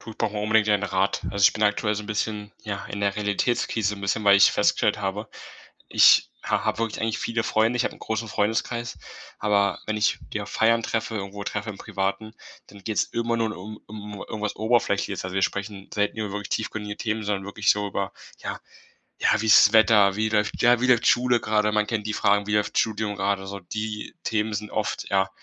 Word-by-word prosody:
Du, 115 - -10
ich - - -13
brauche 105 - 0
mal 105 - -2
unbedingt 110 0 +3
deinen 105 -1 +2
Rat. 95 -1 0
Also, 100 -1 +1
ich - - +7
bin 110 - -4
aktuell 105 +1 +2
so 105 - -4
'n - - -11
bisschen, 105 0 -3
ja, 100 -2 -5
in 100 - -6
der 100 -1 +1
Realitätskrise 105 0 0
'n 100 - -11
bisschen, 100 +2 -1
weil 100 -1 +7
ich 100 - +7
festgestellt - - +2
habe, 105 +1 -3 0.6
ich - - +6
ha - - 0
habe - - -1
wirklich 115 -2 -2
eigentlich 110 0 -1
viele 115 -1 -1
Freunde, 110 +2 +1
ich 120 - +1
habe - - -2
'n - - -19
großen 110 +1 -3
Freundeskreis, 115 +4 -1 0.4
aber 100 -1 +1
wenn 110 0 -2
ich 105 - +2 0.2
die 105 - -2
auf 100 - -8
Feiern 115 +1 +2
treffe, 115 0 -2
irgendwo 100 0 -5
treffe 105 +1 -4
im 100 - -7
Privaten, 105 +2 -3 0.3
dann 100 -1 -15
geht's 110 0 0
immer 115 0 -2
nur 110 -2 -1
um 105 +3 -9
um 105 -1 -9
irgendwas 105 -1 -4
Oberflächliches. 110 -3 0
Also, 95 0 -5
wir 95 - +1
sprechen 100 0 -4
selten 105 +1 -1
über 105 -2 -3
wirklich 105 -1 -5
tiefgründige 105 -1 -3
Themen, 110 -1 -2
sondern 100 -2 -2
wirklich 100 0 -1
so 105 0 +3
über: 100 -1 -3 0.3
„Ja, - - -5 0.6
ja, - - +2
wie 110 - -2
ist 105 - +8
das 105 - -9
Wetter? 105 -3 +5
Wie 110 +1 0
läuft 105 -1 0
ja, 120 -1 +5
wie 125 - +2
läuft 125 -2 +4
Schule 125 0 +3
grade?“ 105 -1 +1
Man 105 0 +1
kennt 105 -2 -2
die 105 - -2
Fragen: 100 0 +2
„Wie 105 - -1
läuft 105 -1 0
Studium 110 -1 0
grade?“ 100 0 -1
So, 100 +1 -6
die 105 +3 -5
Themen 110 0 -1
sind 105 +1 -4
oft, 110 - -3
ja, 95 0 +2
105 Hz, 220 wpm, -25 LUFS, 100-110 Hz, 0.6 s, ist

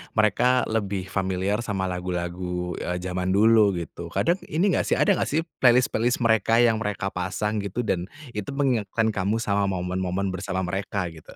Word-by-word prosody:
mereka 115 +4 +3
lebih 100 -3 -2
familiar 95 +2 0
sama 105 -5 -2
lagu-lagu, 90 0 -3
eee, 90 - -2
zaman 90 +1 -1
dulu 110 -2 +5
gitu, 85 0 -6
kadang 170 - 0
ini 180 +6 +1
gak - - 0
sih, - - +2
ada 200 -2 +3
gak - - 0
sih 160 +3 0 0.2
playlist-playlist 120 -1 +3
mereka 115 0 +3
yang 115 -2 +3
mereka 100 -2 -2
pasang 100 +4 -2
gitu 100 +4 -3
dan 90 -4 -1 0.2
itu 105 -2 -5
mengingatkan 115 -5 +1
kamu 100 +1 0
sama 100 -3 0
momen-momen 95 +1 -2
bersama 95 0 -3
mereka 95 +1 -2
gitu? 80 -1 -14
100 Hz, 165 wpm, -25 LUFS, 90-115 Hz, 0.2 s, dulu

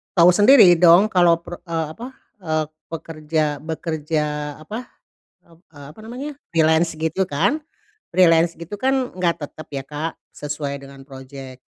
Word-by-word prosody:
tahu 175 0 +7
sendiri 205 -3 +7
dong 180 +5 +6
kalau 170 -2 +3
per 175 0 -9
eee, 165 -1 -1
apa, 230 +10 -8 0.3
eee, 155 -4 -1 0.2
pekerja 155 -1 -3 0.2
bekerja 160 -1 -3 0.4
apa, 220 +9 -7 0.6
ep 165 -1 -23 0.2
eee, 145 -1 -11
apa 160 - -15
namanya, 260 +5 -6 0.2
freelance 160 +1 +3
gitu 160 +4 -1
kan. 180 - 0 0.6
Freelance 170 -2 +4
gitu 175 +5 -8
kan 265 0 0
enggak 170 -3 0
tetep 155 +2 -8
ya, 135 - -3
Kak, 150 +3 -5 0.2
sesuai 145 -1 -5
dengan 140 0 -13
project. 135 -1 -11
165 Hz, 145 wpm, -21 LUFS, 150-180 Hz, 0.6 s, tahu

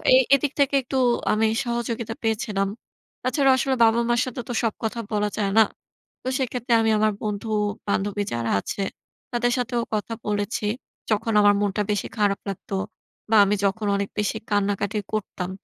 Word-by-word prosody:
এ - - +8 0.2
এদিক 275 0 0
থেকে 280 0 +3
একটু 265 +2 -3 0.4
আমি 220 +1 +3 0.2
সহযোগিতা 235 -2 -3
পেয়েছিলাম। 215 -3 0 0.6
তাছাড়াও 265 +1 +3
আসলে 265 +1 +1
বাবা-মার 235 +1 +3
সাথে 255 -1 -5
তো - - -1
সব 225 -2 +1
কথা 230 +1 -2
বলা 210 0 +1
যায় 200 -2 0
না। - - +9 0.6
তো - - -6
সেক্ষেত্রে 250 -2 -1
আমি 225 - +2
আমার 215 0 +3
বন্ধু, 210 0 -3 0.4
বান্ধবী 205 +1 0
যারা 115 -1 -1
আছে 200 - -4 0.5
তাদের 240 0 +1
সাথেও 240 -1 0
কথা 215 +2 -3
বলেছি। 205 +1 -1 0.5
যখন 220 +2 +1
আমার 205 0 +6
মনটা 205 +1 0
বেশি 205 -3 -1
খারাপ 205 -2 +2
লাগতো 195 +1 -5 0.5
বা 225 - +3
আমি 205 +1 +2
যখন 205 +2 0
অনেক 200 0 -1
বেশি 210 - 0
কান্নাকাটি 205 0 0
করতাম, 190 -3 -3
215 Hz, 160 wpm, -24 LUFS, 205-240 Hz, 0.6 s, না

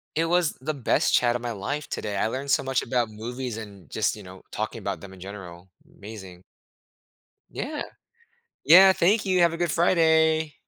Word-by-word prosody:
It 165 - +1
was 175 -1 +1
the 155 +3 -2
best 135 -4 0
chat 120 -1 +3
of 120 - -3
my 120 0 -4
life 140 +9 -4
today, 105 -1 -4
I - - +1
learned 135 +4 -5
so 140 - +2
much 135 -2 0
about 120 -3 -1
movies 120 +2 -6
and 100 -8 -11
just, - - -1
you - - -11
know, 95 0 -12
talking - - -4
about - - -4
them 100 -1 -11
in 95 - -14
general. 95 -2 -10 0.3
Amazing. 95 -4 -11 1.1
Yeah. 300 +1 -5 0.8
Yeah, 190 +5 +8
thank 200 +4 +2
you, 185 -2 +1
have 170 -1 +4
a - - -4
good 175 -1 -1
Friday. 160 -2 +2
130 Hz, 185 wpm, -25 LUFS, 105-165 Hz, 1.1 s, Yeah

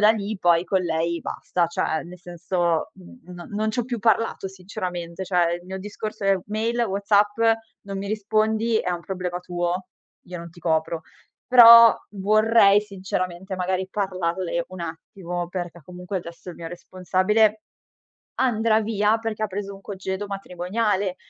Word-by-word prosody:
da 210 +1 +7
lì 215 -1 -2
poi 175 0 +3
con 190 -1 +1
lei 170 0 -1
basta, 175 -1 -1
cioè 160 -1 -1
nel 180 +1 -11
senso 175 -1 -1
n 190 +7 -15
non 175 -1 -10
non 215 +1 -1
ci 245 - -1
ho 235 - -3
più 240 -2 -4
parlato 225 -2 +1
sinceramente, 180 -2 -6
cioè, 175 -2 +2
il - - -18
mio 190 +1 -5
discorso 210 +1 -6
è 195 -1 +3
mail, 225 +3 -1
WhatsApp, 205 0 +2 0.4
non 195 -1 -6
mi 200 - -5
rispondi, 220 +2 +1
è 180 - -2
un 175 - -2
problema 180 0 -4
tuo, 180 0 -3 0.4
io 180 -1 -8
non 170 0 -9
ti 175 +1 -16
copro. 160 0 0 0.4
Però 235 -2 +10 0.2
vorrei 210 0 +4
sinceramente, 190 -2 -4
magari 185 +1 -1
parlarle 185 -3 -2
un 185 -1 -9
attimo, 175 +1 -5
perché 175 -2 -6
comunque 180 +2 -6
adesso 170 +1 -11
il 170 - -11
mio 165 -1 -7
responsabile 185 +5 +1 0.8
andrà 225 -3 +2
via 210 0 +1
perché 220 -1 -3
ha - - 0
preso 200 0 -5
un 195 - -15
congedo 190 0 -5
matrimoniale, 195 0 -2
190 Hz, 160 wpm, -24 LUFS, 175-210 Hz, 0.8 s, Però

